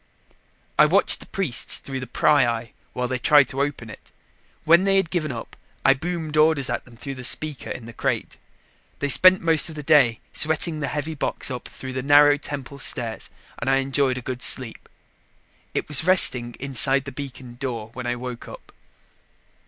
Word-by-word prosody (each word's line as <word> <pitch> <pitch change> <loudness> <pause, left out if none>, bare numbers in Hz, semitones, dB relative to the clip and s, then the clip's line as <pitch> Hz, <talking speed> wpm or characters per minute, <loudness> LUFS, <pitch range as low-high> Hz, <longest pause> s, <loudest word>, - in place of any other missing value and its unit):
I - - +7
watched - - +4
the - - -13
priests 175 -11 0
through 135 -1 -7
the 130 - -8
pryeye 120 -3 +1 0.2
while 125 0 -3
they 130 0 -3
tried 145 0 +4
to 135 - -3
open 140 -5 -4
it. 110 - -14 0.5
When 170 +3 +4
they 195 0 +2
had 190 -4 0
given 155 -5 -2
up, 115 -2 -9 0.3
I 135 - +6
boomed 160 +1 -5
orders 155 -4 +2
at - - -4
them 120 -2 -18
through 135 +1 -8
a - - -8
speaker 150 +2 -2
in 115 - -7
the 115 - -11
crate. - - -3 0.6
They 145 - -3
spent 185 +6 +6
most 165 0 +2
of 160 - -10
the 150 - -7
day 140 -7 +3
sweating 160 +1 0
the 145 - -3
heavy 150 +2 -4
box 145 - -1
up 125 - -7
through 130 -1 -9
the 130 - -3
narrow 145 +1 +5
temple 140 -1 -7
stairs 120 -3 -2 0.3
and 120 - -3
I 135 - +3
enjoyed 135 -1 0
a - - -6
good 125 0 -6
sleep. 125 -4 0 0.9
It - - -2
was 150 0 +4
resting 125 -10 +5
inside 135 0 +2
the 140 - -7
beacon 130 -3 -10
door 115 -5 -5
when 125 -1 -7
I 120 - -2
woke 125 -1 -8
up. - - -13
135 Hz, 190 wpm, -22 LUFS, 125-150 Hz, 0.9 s, I